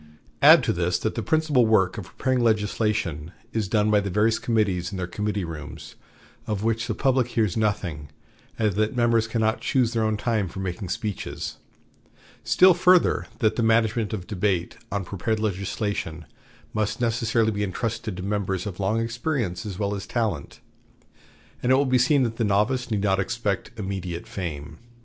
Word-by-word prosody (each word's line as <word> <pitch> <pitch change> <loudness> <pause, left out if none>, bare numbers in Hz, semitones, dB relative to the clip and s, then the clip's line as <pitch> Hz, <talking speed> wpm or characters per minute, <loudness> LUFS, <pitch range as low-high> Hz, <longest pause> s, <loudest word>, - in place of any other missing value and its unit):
Add - - +8
to - - +1
this 85 0 0
that 110 - -2
the 115 - -3
principal 150 -4 +2
work 95 -4 +3
of 105 -5 -6
preparing 130 -1 +1
legislation 105 -7 0 0.2
is 110 -3 -1
done 105 +1 +2
by 105 - +5
the 100 0 -3
various 105 +4 +2
committees 100 -7 0
in 100 - -5
their 90 - -2
committee 105 +2 -2
rooms, 80 -1 -8 0.5
of 105 -2 -2
which 115 0 0
the 110 - -2
public 130 -3 +2
hears 110 -6 0
nothing, 90 -9 -1 0.5
and 110 -3 +1
that 110 +4 0
members 115 -2 +2
cannot 110 -1 0
choose 125 -3 +1
their 115 -1 +1
own 110 -1 +1
time 105 -2 0
for 90 - -8
making 95 0 -4
speeches; 105 +1 -4 0.9
still 185 0 +6
further, 180 0 +3
that 110 -4 +1
the - - +1
management 110 -1 +2
of 100 -5 -4
debate 90 -3 -1 0.2
on 100 -2 -2
prepared 105 +4 -2
legislation 100 -5 -3 0.5
must 110 +1 -1
necessarily 115 -1 +1
be 105 -1 -3
intrusted 110 +1 -3
to 90 - -5
members 100 -2 -2
of 100 -3 -6
long 100 +4 +1
experience 115 - -2
as 95 -3 -6
well 100 0 -1
as 100 -2 -5
talent, 110 - -2 1.0
and 125 - +1
it - - +7
will 140 +2 +3
be 130 -1 +3
seen 135 +2 +4
that 115 -2 -2
the 115 - 0
novice 110 +5 +1
need 105 -3 -1
not 95 -2 +2
expect 105 -1 -2
immediate 95 -4 -4
fame. 80 -4 -6
105 Hz, 175 wpm, -25 LUFS, 95-115 Hz, 1.0 s, Add